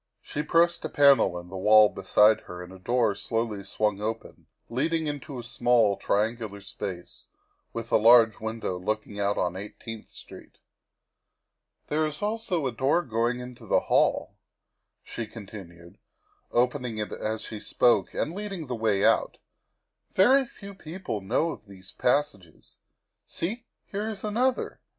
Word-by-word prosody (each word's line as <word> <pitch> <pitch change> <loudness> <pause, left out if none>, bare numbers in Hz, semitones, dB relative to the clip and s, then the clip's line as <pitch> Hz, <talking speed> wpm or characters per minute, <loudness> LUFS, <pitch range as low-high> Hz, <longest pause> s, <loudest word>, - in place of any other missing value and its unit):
' - - -60
' - - -56
She 150 - 0
pressed 170 +3 +2
a - - -3
panel 140 -11 +5
in 90 0 -9
the 95 - -7
wall 105 +2 +7
beside 105 +2 +3
her 90 0 -9
and 90 +1 -11
a 95 - -12
door 120 +2 +1
slowly 110 0 -3
swung 105 0 -1
open, 110 +1 -5 0.2
leading 160 +6 0
into 145 -2 -5
a 120 - -6
small, 120 -3 +2
triangular 110 0 -1
space, 90 -2 -7 0.4
with 115 0 -6
a - - +6
large 115 0 +6
window 110 -4 -4
looking 105 +1 -3
out 100 0 0
on 90 0 0
Eighteenth 105 +3 -8
Street. - - -13 0.6
" - - -54
There 155 +1 +1
is 150 +5 -6
also 210 -7 -1
a 130 - 0
door 135 +8 +1
going 120 0 -1
into 125 -1 -10
the - - +3
hall," - - +2 0.7
she 115 - -6
con 110 -1 -10
tinued, 85 -3 -12 0.5
opening 125 -1 0
it 105 -1 -3
as 110 0 -3
she 110 - -7
spoke 120 +3 +2
and 160 - -1
leading 195 -4 -5
the 125 - -4
way 110 -3 +1
out. - - +2 0.4
" - - -48
Very 260 +7 +5
few 200 -3 -11
people 175 - -6
know 125 +12 0
of 110 - -11
these 95 -1 -13
passages. 125 - -2 0.5
See, 225 +8 -4 0.2
here 210 +2 -4
is 205 -3 -7
another. 245 +5 -1
115 Hz, 160 wpm, -27 LUFS, 105-150 Hz, 0.7 s, wall